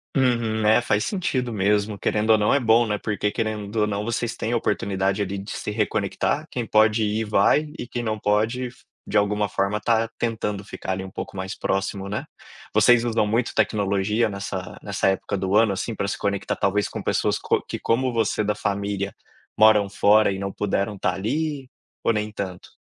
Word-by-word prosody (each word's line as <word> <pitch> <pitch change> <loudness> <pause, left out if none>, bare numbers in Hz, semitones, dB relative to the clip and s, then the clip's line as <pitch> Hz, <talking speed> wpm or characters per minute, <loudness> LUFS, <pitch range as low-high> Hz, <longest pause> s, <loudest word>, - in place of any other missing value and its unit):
Uhum, 115 -4 +1
né, 110 +2 +5
faz 105 -3 0
sentido 175 - -1
mesmo, 105 0 +1
querendo 110 +2 0
ou 110 - +7
não 105 0 +2
é 140 - +4
bom, 115 0 +4
né, 105 -1 -2
porque 105 -1 -1
querendo 110 -1 -3
ou 105 - +3
não 100 0 -2
vocês 120 0 -2
têm 115 - -2
a - - +3
oportunidade 100 -2 0
ali 100 0 -4
de 100 +2 -9
se 105 - -4
reconectar, 105 +8 -1
quem 120 -3 -3
pode 110 +1 +4
ir 105 +1 0
vai 150 +9 +3
e 120 - -5
quem 120 -1 -4
não 110 -1 -2
pode, 110 +5 +1
f - - -15 0.2
de 105 - +1
alguma 105 0 +1
forma, 100 +3 -1
tá 115 0 +2
tentando 105 -3 -2
ficar 95 - -6
ali 95 0 -2
um 95 - -7
pouco - - -7
mais 95 0 -4
próximo, 95 0 -2
né. 105 - -3 0.5
Vocês 120 -1 +5
usam 115 -3 +1
muito 115 +3 0
tecnologia 105 +2 +1
nessa 100 -2 -5
nessa 100 -2 0
época 95 +1 0
do 95 +1 -1
ano, 110 -2 +4
assim, 110 +4 -3
pra 100 - -2
se - - -2
conectar, 100 -1 -1
talvez 100 +1 +1
com - - -6
pessoas - - 0
co - - +1
que - - -4
como 125 +2 +1
você, 110 -2 +1
da 105 +1 +1
família, 100 -1 -2 0.4
moram 105 -2 +5
fora 105 +1 +4
e 95 - -3
não 100 0 -3
puderam 105 0 -1
tá 95 -1 0
ali 135 - -2 0.4
ou 115 - +3
nem 105 0 -2
tanto? 95 -3 -6
105 Hz, 200 wpm, -24 LUFS, 100-115 Hz, 0.5 s, ou